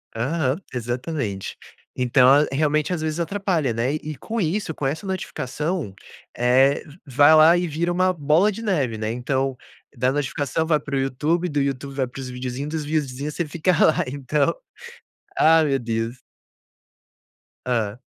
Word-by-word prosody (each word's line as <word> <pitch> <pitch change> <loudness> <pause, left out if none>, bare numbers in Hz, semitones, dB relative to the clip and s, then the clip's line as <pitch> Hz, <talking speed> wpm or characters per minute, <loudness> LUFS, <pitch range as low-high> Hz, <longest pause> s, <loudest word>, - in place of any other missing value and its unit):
Aham. 140 +6 -1
Exatamente. 120 -3 -4 0.4
Então, 125 0 +4 0.2
realmente, 150 +4 +1
às 160 - -3
vezes, 160 +1 -2
atrapalha, 170 - 0
né. 120 +5 0
E - - -3
e - - -6
com 230 - -4
isso, 175 -1 -1
com 145 - -5
essa 160 +8 -3
notificação, 155 - -3 0.4
eh, 130 +3 +3 0.2
vai 145 +3 +5
lá 160 +3 +7
e 175 0 -1
vira 165 +3 -1
uma 185 +1 +2
bola 160 +6 +3
de 225 - -7
neve, 145 - 0
né. 110 +1 -2
Então, 130 +2 -1 0.4
da 125 +2 +1
notificação 145 +2 -1
vai 155 -2 +2
para 140 -2 -5
o - - +1
YouTube. 150 +7 0
Do 145 -1 -1
YouTube 140 0 -3
vai 135 -2 0
pros 130 +1 -8
vídeozinhos. 125 +3 -5
Dos 155 -2 -2
videozinhos, 145 -1 -2
você 170 - -1
fica 165 +4 0
lá. 160 -2 +3
Então 140 +2 0 0.8
Ai, 160 0 +5
meu 135 -2 +1
Deus. 115 +1 -3 1.5
Hã. 115 -3 -1
145 Hz, 155 wpm, -23 LUFS, 125-160 Hz, 1.5 s, lá